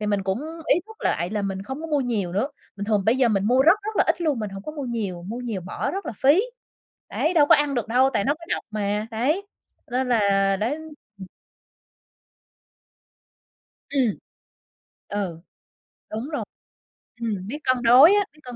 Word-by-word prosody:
thì 210 - -2
mình 205 -1 0
cũng 190 +4 -1 0.3
ý - - 0
thức 440 0 -13
lại 170 +3 0
là 210 -1 -2
mình 195 -1 -3
không 265 +8 -6
có 325 - -5
mua 300 -3 +1
nhiều 215 -9 -1
nữa, 210 +10 0 0.3
bình 200 - -4
thường 210 -1 +1
bây 225 +5 +3
giờ 260 -2 +3
mình 200 -3 +1
mua 250 +5 +4
rất 345 +8 +5
rất 430 +1 -5
là - - +4
ít - - +1
luôn, 305 -7 +1
mình 210 -2 -4
hổng 195 0 -8
có 305 - -6
mua 295 -3 -5
nhiều, 210 -8 -3
mua 215 +7 -6
nhiều 225 -6 -4
bỏ 180 - -3
rất 395 +1 -5
là - - -3
phí. 290 - +4 0.7
Đấy, 325 +3 0
đâu 295 -3 +5
có - - +7
ăn 295 -1 0
được 240 -3 -2
đâu, 255 +3 +4
tại 200 - +1
nó 285 - +2
có 330 +2 -13
độc - - -6
mà, 210 0 -1
đấy, 295 - 0 0.4
nên 255 +1 0
là 200 -4 +3
đấy. 220 +8 -1 0.4
Ừm. 190 - -8 2.6
Ừm. 260 -7 +1 0.9
Ừ, 190 -5 -3 0.7
đúng 225 +6 -4
rồi. 300 - -3 0.8
Ừm, 205 -5 -3
biết 270 +7 -4
cân 255 -1 +1
đối 260 +10 +8
á, 410 -1 +3
biết 305 - -22
cân 250 -1 -8
235 Hz, 200 wpm, -24 LUFS, 200-285 Hz, 2.6 s, đối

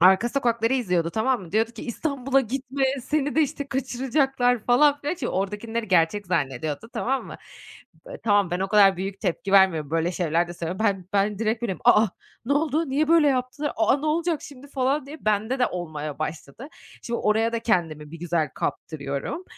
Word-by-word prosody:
arka 190 +6 +5
sokakları 235 -3 0
izliyordu, 180 -9 0
tamam 245 +3 0
mı, 170 - -12
diyordu 225 +2 +1
ki: 220 - -9
"İstanbul'a 270 +1 0
gitme. 270 +2 -2 0.2
Seni 290 +1 -1
de, 315 - +5
işte, 285 -1 -3
kaçıracaklar." 260 -2 0
falan, 285 +4 +4
filan. 295 +5 -2
Şimdi, 360 - -4
oradakileri 210 +3 -3
gerçek 180 +3 +2
zannediyordu, 155 - -2
tamam 265 +1 -1
mı? - - -8 0.7
Be - - -7
tamam, 205 -4 +3
ben 175 +1 -2
o 195 - -1
kadar 200 -3 +5
büyük 195 +1 -5
tepki 195 0 -2
vermiyorum, 170 -7 +4
böyle 165 +2 0
şeyler 170 0 0
de 175 - -7
söylüyorum. 180 +6 -2
Ben 190 -3 -1
ben 200 0 +1
direkt 225 +1 -1
böyleyim, 190 -6 -3
"A 210 - +7
a, 200 - -3 0.4
ne 280 - +1
oldu, 310 +1 +1
niye 300 +3 +1
böyle 325 -3 +5
yaptılar? 260 +3 -1
A 220 -1 +1
a, 280 - +2
ne 305 - -4
olacak 325 0 0
şimdi?" 280 -1 -12
falan 270 +1 0
diye 305 -2 -11
bende 215 +5 +1
de 250 - +3
olmaya 155 -4 -5
başladı. 155 - -6 0.3
Şimdi, 235 0 -3
oraya 220 +2 +2
da 230 - 0
kendimi 160 -9 -1
bir 165 - -9
güzel 170 -3 0
kaptırıyorum. 140 - -4
225 Hz, 190 wpm, -24 LUFS, 180-270 Hz, 0.7 s, A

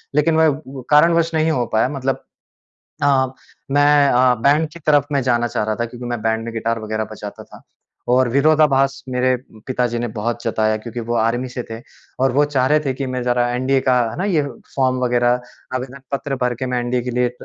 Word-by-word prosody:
लेकिन 160 +2 +3
वह 155 -2 +3 0.3
कारण 150 +3 +6
वश 165 0 +1
नहीं 160 +1 +2
हो 125 -5 0
पाया 110 +3 +3
मतलब 135 -2 -3 0.8
अ, 135 -2 +4 0.5
मैं 145 0 +5
अ, 125 -1 +4
बैंड 150 +3 +3
की 170 - -10
तरफ 145 -2 +4
में 140 - +2
जाना 120 -1 +1
चाह 105 - -2
रहा 110 0 -1
था, 120 - -1
क्योंकि 120 +1 -9
मैं 120 -2 -3
बैंड 110 0 0
में 115 - -5
गिटार 115 0 -1
वगैरह 110 0 -3
बजाता 105 -1 -8
था - - -15 0.5
और 125 0 +4
विरोधाभास 140 -1 +3
मेरे 130 0 +2 0.3
पिताजी 125 -2 -1
ने 120 - -2
बहुत 115 +2 -3
जताया 110 -1 +1
क्योंकि 115 +2 -6
वो 120 - 0
आर्मी 115 +3 0
से 125 0 -5
थे 115 +1 -6 0.4
और 135 -1 +3
वो 145 +3 +3
चाह 140 -3 +1
रहे 150 0 +4
थे 135 -3 -1
कि 135 0 -4
मैं 130 -1 -3
जरा 120 0 +1
एनडीए 130 +2 +1
का, 130 -2 +2
है - - -8
ना, 190 - -1
ये 170 -7 +2 0.3
फॉर्म 130 -1 +2
वगैरह 120 0 +2 0.3
आवेदन 130 +1 -5
पत्र 140 0 -2
भर 125 0 +1
के 130 +2 -4
मैं 125 -1 -1
एनडीए 120 0 -1
के 125 - -4
लिए 125 0 +1
125 Hz, 215 wpm, -20 LUFS, 120-140 Hz, 0.8 s, कारण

